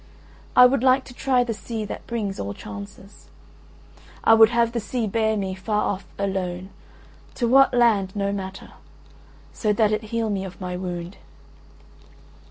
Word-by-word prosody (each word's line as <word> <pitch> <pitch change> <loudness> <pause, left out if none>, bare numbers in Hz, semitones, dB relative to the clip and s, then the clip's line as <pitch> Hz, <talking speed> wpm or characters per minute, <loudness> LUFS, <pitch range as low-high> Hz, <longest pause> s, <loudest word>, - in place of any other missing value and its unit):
I 250 - +9
would 250 0 +3
like 260 +1 +4
to 245 - -12
try 255 -1 +1
the 235 -2 -3
sea 220 0 -5
that - - -8
brings 210 -5 -3
all 100 +1 -4
chances.… 100 - -11 1.0
I - - +6
would 220 -1 +7
have 235 -1 +2
the 235 - -2
sea 230 +2 -3
bear 220 +1 0
me 190 -2 -2
far 210 +3 -1
off 195 -1 -2
alone, 190 -1 -3 0.6
to 240 - 0
what 270 +3 +6
land 215 -6 +2
no 200 -1 -1
matter, 190 -1 -7 0.8
so 215 - 0
that 215 0 +2
it 215 +1 -1
heal 225 0 -2
me 195 -1 -2
of 190 -1 -9
my 180 -1 -4
wound." 180 0 -5
210 Hz, 165 wpm, -23 LUFS, 190-235 Hz, 1.0 s, I